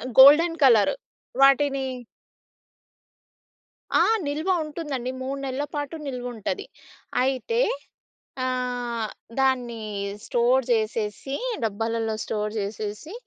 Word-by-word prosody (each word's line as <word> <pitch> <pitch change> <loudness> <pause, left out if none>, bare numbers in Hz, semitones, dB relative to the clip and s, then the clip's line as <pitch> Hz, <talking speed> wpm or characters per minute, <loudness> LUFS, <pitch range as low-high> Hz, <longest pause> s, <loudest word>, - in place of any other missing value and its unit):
ఆహ్, 255 - -5
golden 315 +5 +8
colour. 230 -6 +6 0.5
వాటినీ 275 0 +4 2.1
ఆ! - - +7 0.2
నిల్వ 305 +6 -2 0.2
ఉంటుందండి. 290 -5 -4
3 270 +2 -3
నెల్ల 265 +2 -2
పాటు 290 +2 -3
నిల్వుంటది. 245 - -4 0.6
అయితే, 270 - 0 0.8
ఆహ్, 245 -3 -2 0.3
దాన్నీ 245 -4 +1 0.4
స్టోర్ 245 +2 +3
జేసేసి, 220 +4 -1 0.3
డబ్బాలల్లో 225 +1 -1
స్టోర్ 210 -1 -2
జేసేసి 210 - -5
255 Hz, 85 wpm, -25 LUFS, 225-275 Hz, 2.1 s, golden